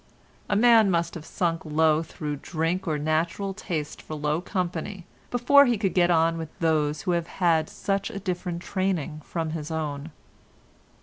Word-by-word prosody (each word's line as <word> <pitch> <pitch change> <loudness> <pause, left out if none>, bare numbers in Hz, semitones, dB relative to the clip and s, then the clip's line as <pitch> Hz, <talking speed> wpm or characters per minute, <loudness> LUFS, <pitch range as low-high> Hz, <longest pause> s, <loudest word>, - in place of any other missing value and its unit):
A 205 - +2
man 225 -1 +6
must 170 -2 0
have 160 -2 -8
sunk 165 -2 -1
low 155 0 +3
through 150 -2 -5
drink 165 +5 -2
or 155 -2 +1
natural 165 +6 -1
taste 165 -7 -4
for 155 - -7
low 150 +2 -1
company, 180 -1 -3 0.2
before 280 +3 +6
he 240 -2 +2
could 195 -2 0
get 175 -1 +4
on 165 -1 +3
with 160 -1 -5
those 155 -2 +1
who 185 - 0
have 170 -1 0
had 165 -4 +1
such 200 +1 -2
a 225 - -6
different 180 -2 -3
training 175 -6 -2
from 165 -1 -3
his 155 -1 -5
own." 155 -2 -3
170 Hz, 170 wpm, -26 LUFS, 155-190 Hz, 0.2 s, man